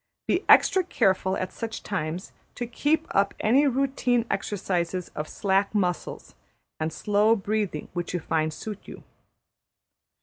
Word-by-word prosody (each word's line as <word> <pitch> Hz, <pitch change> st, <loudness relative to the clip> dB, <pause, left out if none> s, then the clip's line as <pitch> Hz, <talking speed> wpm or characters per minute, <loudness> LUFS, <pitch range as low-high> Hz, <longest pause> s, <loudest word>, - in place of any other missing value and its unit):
Be 365 Hz, -, +1 dB
extra 375 Hz, -, +6 dB
careful, 190 Hz, -, +1 dB
at 185 Hz, -, -4 dB
such 225 Hz, -1 st, -5 dB
times, 180 Hz, -2 st, -3 dB, 0.2 s
to 240 Hz, -, -3 dB
keep 295 Hz, +7 st, 0 dB
up 200 Hz, 0 st, +2 dB
any 270 Hz, +7 st, +4 dB
routine 260 Hz, -3 st, +1 dB
exercises 185 Hz, -3 st, -2 dB
of 150 Hz, +1 st, -5 dB
slack 195 Hz, +1 st, 0 dB
muscles 180 Hz, -4 st, -2 dB, 0.5 s
and 160 Hz, 0 st, -1 dB
slow 210 Hz, +7 st, +3 dB
breathing 205 Hz, -6 st, -2 dB
which 175 Hz, -1 st, -3 dB
you 180 Hz, -, -1 dB
find 155 Hz, 0 st, 0 dB
suit 205 Hz, +5 st, -6 dB
you. -, -, -10 dB
200 Hz, 135 wpm, -26 LUFS, 180-230 Hz, 0.5 s, extra